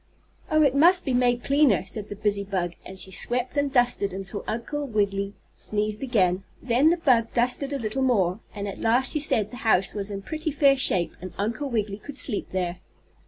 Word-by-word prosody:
"Oh, 310 0 +4
it 280 -3 +3
must 350 +6 +5
be 265 - 0
made 245 -1 +2
cleaner," 275 -10 +3
said 205 +2 -6
the 205 - -5
busy 205 -1 -1
bug, 185 -3 -2
and 190 - -10
she 190 - -3
swept 245 +7 -1
and 285 -1 0
dusted 245 -7 +2
until 195 +1 -5
Uncle 285 +6 -3
Wiggily 200 -3 -1 0.2
sneezed 210 0 -2
again. 190 -8 +1 0.2
Then 255 +5 +3
the 345 - +2
bug 250 -9 +2
dusted 250 +4 +1
a 280 - -1
little 230 +1 -2
more, 205 -7 +2 0.2
and 205 0 -4
at 195 - -7
last 245 +3 +3
she 305 - +1
said 220 -8 +2
the 245 - -8
house 215 -6 +2
was 205 -1 -4
in 195 -1 -6
pretty 315 - -3
fair 280 -2 +4
shape 185 -10 0
and 185 -1 -8
Uncle 225 +8 -2
Wiggily 210 -4 -2
could 280 +5 -9
sleep 210 - -1
there. 180 -1 -3
225 Hz, 205 wpm, -25 LUFS, 200-270 Hz, 0.2 s, must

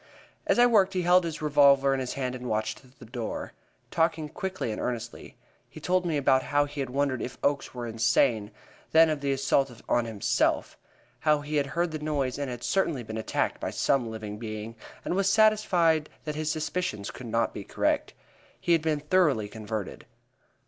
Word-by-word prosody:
As - - +3
I 240 - +7
worked, 205 -5 +4
he 180 -1 0
held 180 +1 +5
his 160 -2 -5
revolver 140 -2 +5
in 135 - -1
his 130 -1 -3
hand 130 -2 -3
and 125 -1 -6
watched 110 +5 -3
the 115 - -12
door, 115 -1 -5 0.4
talking 160 -2 0
quickly 190 -7 -4
and 105 - -4
earnestly. 120 -1 -5 0.3
He - - -11
told 180 0 +1
me 160 -3 0
about 135 -2 +3
how 145 +1 +1
he 145 0 -8
had 135 -2 -2
wondered 135 -1 0
if 130 - -5
Oakes 140 -2 0
were 120 -1 -4
insane, 115 -1 +2 0.4
then 160 0 +6
of 150 -2 -3
the 140 -1 0
assault 135 -2 +1
on 120 -1 +2
himself; 110 -3 0 0.4
how 150 +2 +2
he 150 +1 -2
had 140 -1 +1
heard 170 +3 -1
the 155 - -4
noise 145 -4 -2
and 140 -2 -2
had 120 -1 -6
certainly 165 -9 0
been 110 0 -6
attacked 110 - -1
by - - -2
some 125 -4 +1
living 105 -2 -6
being, 110 0 -6 0.3
and - - -1
was 195 +1 +2
satisfied 195 -7 +3
that 150 - -3
his 155 +1 -2
suspicions 155 - -3
could 125 - -9
not 115 +1 0
be - - -6
correct. - - -1 0.4
He - - -1
had 165 -2 +4
been 155 -2 0
thoroughly 150 - +2
converted. 110 -1 -6
140 Hz, 190 wpm, -27 LUFS, 120-160 Hz, 0.4 s, I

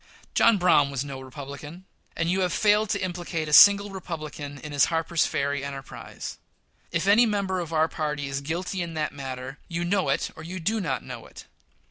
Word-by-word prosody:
John 230 -2 +5
Brown 175 -6 +4
was 140 0 -3
no 135 -2 -7
Republican; 140 +6 -9 0.3
and 165 - -1
you 185 +3 +1
have 180 -1 +1
failed 210 +2 +3
to - - -1
implicate 175 -3 -3
a 150 - -3
single 200 +4 +8
Republican 155 -6 -6
in 150 +1 -8
his 145 -1 +4
Harper's 165 0 +1
Ferry 140 0 -1
enterprise. 140 -1 -7 0.5
If 170 +1 0
any 215 +4 +6
member 200 -3 -1
of 170 -2 -5
our 160 0 +3
party 150 -2 -3
is 135 0 -3
guilty 175 +5 -3
in 170 -1 -5
that 155 -1 -2
matter 130 0 -6
you 170 0 -3
know 190 +1 +1
it - - 0
or - - -10
you 180 +4 -6
do 215 +6 0
not 135 -8 -2
know 125 -3 -8
it. - - -13
160 Hz, 195 wpm, -26 LUFS, 140-185 Hz, 0.5 s, single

